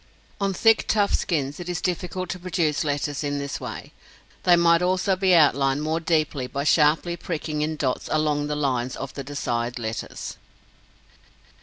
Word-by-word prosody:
On 200 Hz, -1 st, +1 dB
thick, 225 Hz, +4 st, +3 dB
tough 205 Hz, -2 st, +2 dB
skins 145 Hz, -5 st, -1 dB
it 175 Hz, 0 st, -6 dB
is 175 Hz, -1 st, -2 dB
difficult 180 Hz, +1 st, -3 dB
to 185 Hz, -, -5 dB
produce 170 Hz, -4 st, 0 dB
letters 145 Hz, 0 st, -2 dB
in 145 Hz, 0 st, -1 dB
this 140 Hz, -1 st, -4 dB
way. -, -, -7 dB, 0.5 s
They 175 Hz, -, +7 dB
might 170 Hz, 0 st, +4 dB
also 185 Hz, +1 st, +1 dB
be 185 Hz, -1 st, +3 dB
outlined 140 Hz, -2 st, +3 dB
more 160 Hz, +1 st, 0 dB
deeply 155 Hz, -5 st, 0 dB
by 140 Hz, +2 st, -3 dB
sharply 155 Hz, +3 st, +3 dB
pricking 155 Hz, -3 st, -4 dB
in 155 Hz, +1 st, -1 dB
dots 135 Hz, -4 st, -2 dB
along 150 Hz, -1 st, +1 dB
the 150 Hz, -, -2 dB
lines 130 Hz, -3 st, -1 dB
of 135 Hz, -1 st, -6 dB
the 140 Hz, -, -6 dB
desired 125 Hz, -4 st, -3 dB
letters. 110 Hz, -2 st, -5 dB
155 Hz, 165 wpm, -24 LUFS, 140-175 Hz, 0.5 s, They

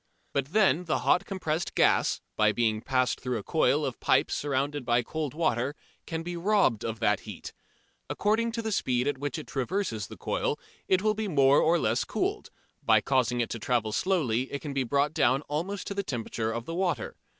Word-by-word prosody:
But 140 Hz, -1 st, 0 dB
then 180 Hz, -2 st, +3 dB
the 165 Hz, -, +1 dB
hot -, -, +3 dB
compressed 170 Hz, -4 st, -3 dB
gas, -, -, +3 dB
by 105 Hz, -1 st, +4 dB
being 110 Hz, -1 st, 0 dB
passed 130 Hz, 0 st, 0 dB
through 125 Hz, -2 st, -2 dB
a 105 Hz, -, -6 dB
coil -, -, +2 dB
of -, -, -4 dB
pipe -, -, +2 dB
surrounded 145 Hz, 0 st, -1 dB
by 120 Hz, 0 st, +2 dB
cold 150 Hz, +1 st, -4 dB
water, 140 Hz, -4 st, 0 dB, 0.3 s
can 165 Hz, 0 st, -3 dB
be 175 Hz, +1 st, -5 dB
robbed 175 Hz, -, +2 dB
of 115 Hz, -1 st, -3 dB
that 105 Hz, -3 st, +3 dB
heat. -, -, -9 dB, 0.6 s
According 225 Hz, +3 st, +1 dB
to 230 Hz, -1 st, -3 dB
the 220 Hz, -, -2 dB
speed 125 Hz, -9 st, 0 dB
at 145 Hz, -2 st, -1 dB
which 145 Hz, -2 st, -3 dB
it -, -, -6 dB
traverses 135 Hz, -, -2 dB
the -, -, -11 dB
coil -, -, -1 dB, 0.3 s
it 185 Hz, +1 st, +2 dB
will 215 Hz, 0 st, +3 dB
be 215 Hz, 0 st, -3 dB
more 140 Hz, -5 st, +4 dB
or 165 Hz, +2 st, +4 dB
less 115 Hz, -5 st, +1 dB
cooled: -, -, -2 dB, 0.3 s
by -, -, +5 dB
causing 125 Hz, -2 st, +1 dB
it 115 Hz, -, -2 dB
to 115 Hz, -, -4 dB
travel 115 Hz, -1 st, 0 dB
slowly 130 Hz, -, 0 dB
it 140 Hz, -, -5 dB
can 145 Hz, -3 st, -4 dB
be 135 Hz, -1 st, 0 dB
brought 140 Hz, +4 st, +1 dB
down 130 Hz, 0 st, +2 dB
almost 175 Hz, +8 st, -3 dB
to -, -, -4 dB
the 200 Hz, -, -1 dB
temperature 115 Hz, -, -3 dB
of 115 Hz, +1 st, -4 dB
the 165 Hz, -, -5 dB
water. 175 Hz, -2 st, -1 dB
140 Hz, 205 wpm, -28 LUFS, 120-175 Hz, 0.6 s, by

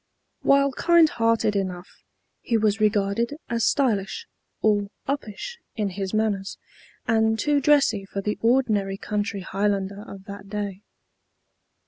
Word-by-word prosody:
While 275 Hz, 0 st, +4 dB
kind 340 Hz, +4 st, +5 dB
hearted 230 Hz, -5 st, +1 dB
enough, 185 Hz, -2 st, -4 dB, 0.4 s
he 230 Hz, -, 0 dB
was 215 Hz, 0 st, +1 dB
regarded 210 Hz, +4 st, +1 dB
as 230 Hz, -1 st, +1 dB
stylish, 255 Hz, -, +1 dB, 0.4 s
or 205 Hz, -2 st, +2 dB, 0.2 s
uppish 280 Hz, -, -4 dB, 0.2 s
in 210 Hz, -3 st, -1 dB
his 190 Hz, 0 st, -4 dB
manners, 210 Hz, -3 st, -1 dB, 0.5 s
and 220 Hz, 0 st, +3 dB
too 290 Hz, +3 st, +2 dB
dressy 275 Hz, -9 st, +3 dB
for 195 Hz, -, -5 dB
the 210 Hz, +2 st, -2 dB
ordinary 220 Hz, -5 st, +2 dB
country 205 Hz, 0 st, -2 dB
Highlander 200 Hz, +1 st, -1 dB
of 195 Hz, -1 st, -10 dB
that 200 Hz, 0 st, -10 dB
day. 200 Hz, -2 st, -4 dB
210 Hz, 125 wpm, -24 LUFS, 200-235 Hz, 0.5 s, kind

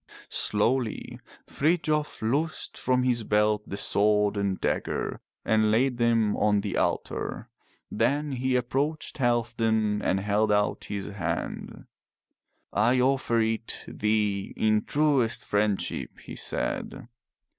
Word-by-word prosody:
Slowly 115 Hz, +2 st, 0 dB, 0.3 s
Frithjof 155 Hz, -3 st, 0 dB
loosed 145 Hz, +8 st, -1 dB
from 125 Hz, 0 st, +1 dB
his 120 Hz, -2 st, +1 dB
belt 105 Hz, 0 st, +1 dB
the 100 Hz, -, -4 dB
sword 105 Hz, 0 st, +2 dB
and 100 Hz, -2 st, -1 dB
dagger -, -, -2 dB, 0.2 s
and 110 Hz, -1 st, +3 dB
laid 125 Hz, +3 st, +2 dB
them 115 Hz, -3 st, +2 dB
on 105 Hz, -1 st, +2 dB
the 100 Hz, -2 st, -3 dB
altar, -, -, -2 dB, 0.4 s
then 145 Hz, +1 st, 0 dB
he 130 Hz, 0 st, 0 dB
approached 140 Hz, +6 st, -1 dB
Halfdan 115 Hz, -3 st, +1 dB
and 95 Hz, -, +1 dB
held 105 Hz, +2 st, +1 dB
out 105 Hz, 0 st, +1 dB
his 100 Hz, -1 st, -4 dB
hand. 85 Hz, -4 st, -4 dB, 0.9 s
"I 125 Hz, +1 st, +3 dB
offer 125 Hz, -3 st, +2 dB
it 110 Hz, +1 st, -2 dB
thee 105 Hz, -2 st, -1 dB
in 110 Hz, -1 st, +2 dB
truest 145 Hz, -6 st, +1 dB
friendship," 105 Hz, -1 st, -1 dB
he -, -, -10 dB
said. -, -, -3 dB
110 Hz, 115 wpm, -27 LUFS, 105-130 Hz, 0.9 s, and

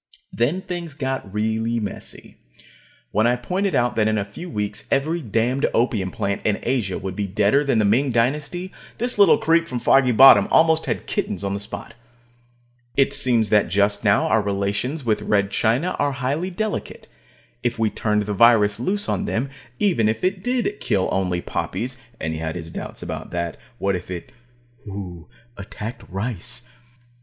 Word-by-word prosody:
Then 145 Hz, +11 st, 0 dB
things 175 Hz, -5 st, -6 dB
got 135 Hz, -8 st, -3 dB
really 110 Hz, +2 st, 0 dB
messy. 105 Hz, -2 st, -7 dB, 0.7 s
When 110 Hz, +3 st, +3 dB
I 120 Hz, -, +3 dB
pointed 185 Hz, +10 st, -1 dB
out 120 Hz, 0 st, +1 dB
that 110 Hz, -1 st, +3 dB
in 110 Hz, 0 st, +1 dB
a 100 Hz, -, -1 dB
few 170 Hz, -, -9 dB
weeks 105 Hz, -8 st, -3 dB
every 155 Hz, +5 st, 0 dB
damned 120 Hz, +3 st, 0 dB
opium 110 Hz, -5 st, +1 dB
plant 100 Hz, +2 st, -2 dB
in 105 Hz, -2 st, +1 dB
Asia 115 Hz, -7 st, -1 dB
would 95 Hz, -1 st, -5 dB
be 100 Hz, 0 st, -2 dB
deader 105 Hz, +8 st, +2 dB
than 135 Hz, -5 st, +1 dB
the 110 Hz, -, +3 dB
Ming 125 Hz, +7 st, +3 dB
Dynasty, 145 Hz, +10 st, -1 dB, 0.3 s
this 245 Hz, -1 st, +3 dB
little 205 Hz, +2 st, +7 dB
creep 170 Hz, -6 st, +2 dB
from 125 Hz, -4 st, -3 dB
Foggy 135 Hz, +1 st, +4 dB
Bottom 115 Hz, -4 st, +8 dB
almost 160 Hz, 0 st, +4 dB
had -, -, -2 dB
kittens 95 Hz, -, -3 dB
on 100 Hz, 0 st, -1 dB
the 100 Hz, -, -3 dB
spot. 105 Hz, +2 st, -8 dB, 1.0 s
It 140 Hz, 0 st, +3 dB
seems 125 Hz, -6 st, +2 dB
that 105 Hz, -1 st, +4 dB
just 100 Hz, +3 st, +1 dB
now 100 Hz, -1 st, +3 dB
our 110 Hz, -, +3 dB
relations 100 Hz, +8 st, -2 dB
with 110 Hz, -2 st, +1 dB
Red 100 Hz, -1 st, +1 dB
China 130 Hz, +11 st, +1 dB
are 145 Hz, -1 st, +1 dB
highly 140 Hz, +7 st, -2 dB
delicate. 215 Hz, +3 st, -4 dB, 0.5 s
If 120 Hz, -1 st, -1 dB
we 110 Hz, -1 st, +1 dB
turned 105 Hz, -1 st, 0 dB
the 105 Hz, 0 st, -3 dB
virus 105 Hz, -1 st, +5 dB
loose 205 Hz, +10 st, -1 dB
on 205 Hz, -, -1 dB
them, 135 Hz, -, -2 dB, 0.3 s
even 165 Hz, -, +2 dB
if 110 Hz, 0 st, -2 dB
it 185 Hz, 0 st, 0 dB
did 245 Hz, -4 st, -1 dB
kill 95 Hz, -2 st, 0 dB
only 90 Hz, -2 st, 0 dB
poppies 125 Hz, +7 st, -4 dB, 0.2 s
(and 80 Hz, 0 st, -2 dB
he 80 Hz, -, -4 dB
had 80 Hz, -1 st, -3 dB
his 85 Hz, -2 st, -7 dB
doubts -, -, -6 dB
about -, -, -6 dB
that. 85 Hz, -2 st, -3 dB, 0.2 s
What 100 Hz, -1 st, 0 dB
if 90 Hz, -, -6 dB
shudder 90 Hz, -2 st, -7 dB, 0.6 s
it 95 Hz, -4 st, -7 dB, 0.3 s
attacked 105 Hz, +4 st, -7 dB
rice?) 120 Hz, +4 st, -4 dB
115 Hz, 175 wpm, -22 LUFS, 100-145 Hz, 1.0 s, Bottom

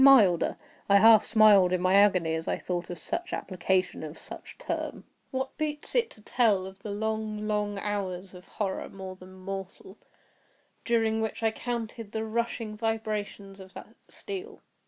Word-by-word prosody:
Milder! 215 Hz, -11 st, +6 dB, 0.3 s
I 200 Hz, -, +7 dB
half 220 Hz, +1 st, +8 dB
smiled 210 Hz, -4 st, +6 dB
in 185 Hz, -, +2 dB
my 185 Hz, +1 st, +2 dB
agony 190 Hz, -5 st, +5 dB
as 160 Hz, 0 st, -3 dB
I -, -, 0 dB
thought 175 Hz, -1 st, -3 dB
of 175 Hz, -, -5 dB
such 355 Hz, -, -4 dB
application 185 Hz, 0 st, 0 dB
of 155 Hz, 0 st, -7 dB
such -, -, -10 dB
a -, -, -16 dB
term. -, -, -3 dB, 0.3 s
What 265 Hz, 0 st, -3 dB
boots 300 Hz, -1 st, -2 dB
it 475 Hz, -2 st, +2 dB
to 215 Hz, -, -16 dB
tell 210 Hz, -4 st, +2 dB
of 190 Hz, 0 st, -10 dB
the 210 Hz, -, -6 dB
long, 215 Hz, 0 st, -2 dB
long 210 Hz, -1 st, -1 dB
hours 195 Hz, -2 st, -3 dB
of 180 Hz, 0 st, -13 dB
horror 195 Hz, -3 st, -3 dB
more 190 Hz, -1 st, -8 dB
than 185 Hz, 0 st, -14 dB
mortal, 190 Hz, +1 st, -7 dB, 0.8 s
during 225 Hz, -2 st, +2 dB
which 220 Hz, +1 st, -3 dB
I 225 Hz, -, +3 dB
counted 230 Hz, -2 st, -5 dB
the 220 Hz, 0 st, -2 dB
rushing 230 Hz, -1 st, -2 dB
vibrations 210 Hz, -3 st, -3 dB
of 190 Hz, 0 st, -13 dB
the -, -, -8 dB, 0.2 s
steel! 400 Hz, +2 st, -6 dB
210 Hz, 170 wpm, -28 LUFS, 190-225 Hz, 0.8 s, half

